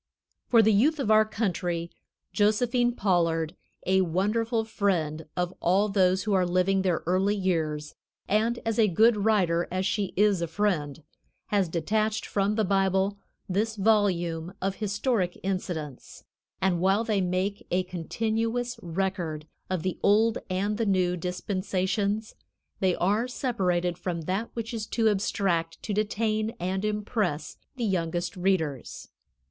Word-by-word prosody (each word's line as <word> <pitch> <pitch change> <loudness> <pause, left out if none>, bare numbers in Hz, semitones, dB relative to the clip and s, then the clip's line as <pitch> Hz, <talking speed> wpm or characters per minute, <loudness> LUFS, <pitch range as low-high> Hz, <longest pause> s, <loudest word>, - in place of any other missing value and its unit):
For 230 -2 +5
the 220 0 +4
youth 285 +10 +3
of 220 -6 +1
our 215 0 +6
country 180 -6 -2 0.4
Josephine 240 +3 +2
Pollard, 170 -4 +1 0.3
a 190 +1 +3
wonderful 215 +6 0
friend 165 -8 -1
of 180 0 -1
all 195 +4 +2
those 190 -2 +2
who 210 - 0
are 190 -1 +4
living 185 +2 +2
their 180 -3 0
early 190 +4 +2
years, 160 -6 -1 0.3
and 225 +3 +1
as 225 0 0 0.2
good 225 +3 +6
a - - -2
writer 185 -5 +2
as 185 +1 -1
she 200 -1 -1
is 205 -3 +3
a 170 - -1
friend, 165 -5 -1 0.5
has 200 -4 +1
detached 215 +7 0
from 200 +1 0
the 220 - +2
Bible 195 +1 +1 0.3
this 215 +4 0
volume 190 -5 +1
of 195 0 -2
historic 205 -2 -1
incidents, 175 -7 -4 0.4
and 180 -2 +1
while 195 +4 +3
they 215 -4 0
make 185 +2 -2
a 185 +1 +1
continuous 225 +7 -2
record 175 -3 -3 0.2
of 185 -3 -2
the 185 - -2
old 220 +3 +3
and 200 +4 -1
the 230 - +1
new 185 -2 +2
dispensations, 190 +4 -2 0.5
they 185 -2 +2
are 210 +7 +1
separated 180 -9 -1
from 170 -2 -3
that 190 +8 -2
which 230 +1 -4
is 215 -2 -4
too 225 -2 +1
abstract 190 -4 0
to 210 - -3
detain 215 +2 0
and 190 +2 -2
impress 210 -6 -2 0.2
the 240 -3 -2
youngest 175 -2 -1
readers. 175 -8 -1
195 Hz, 140 wpm, -27 LUFS, 180-215 Hz, 0.5 s, our